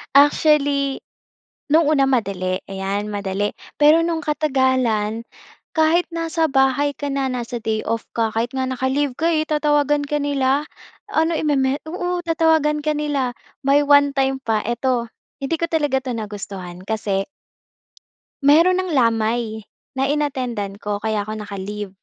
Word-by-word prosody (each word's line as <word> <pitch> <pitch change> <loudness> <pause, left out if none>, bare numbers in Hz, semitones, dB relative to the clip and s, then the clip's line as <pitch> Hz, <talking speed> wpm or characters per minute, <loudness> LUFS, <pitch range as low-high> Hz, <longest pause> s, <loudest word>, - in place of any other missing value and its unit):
Actually, 285 -1 +3 0.7
nung 320 0 +5
una 280 -3 +4
madali, 190 -7 0
ayan, 195 +2 -3
madali. 200 0 -2 0.3
Pero 305 +2 +6
nung 330 -1 -1
katagalan, 260 -7 +1 0.5
kahit 320 +2 +3
nasa 330 -1 0
bahay 270 +1 +2
ka 285 - -4
na, 275 -1 -1
nasa 240 -1 -4
day 220 -1 -1
off 230 0 -1
ka, 225 -1 +1
kahit 230 +2 0
nga 260 0 0
naka-leave 260 +1 -1
ka, 330 - +1
eh 310 -1 +1
tatawagan 295 -1 +2
ka 295 - 0
nila. 280 0 +1 0.5
Ano, 320 0 +1
i-meme 280 -2 +1
oo, 355 +1 -2
tatawagan 320 -2 +2
ka 305 0 +1
nila. 285 -4 -1 0.3
May 280 +1 +4
one-time 280 -2 +3
pa 220 -1 +1
eto, 240 +1 0 0.3
hindi 275 +4 -1
ko 335 - 0
talaga 290 -5 +1
ito 260 - -3
nagustuhan 195 -4 -7
kasi 200 -2 -2 1.2
meron 335 +6 +6
ng 370 -3 -2
lamay, 225 -3 +1 0.3
na 265 - +2
in-attend-an 255 -9 -2
ko 205 0 -4
kaya 215 -2 -1
'ko 215 - -5
naka-leave. 205 -1 -6
265 Hz, 140 wpm, -21 LUFS, 220-295 Hz, 1.2 s, Pero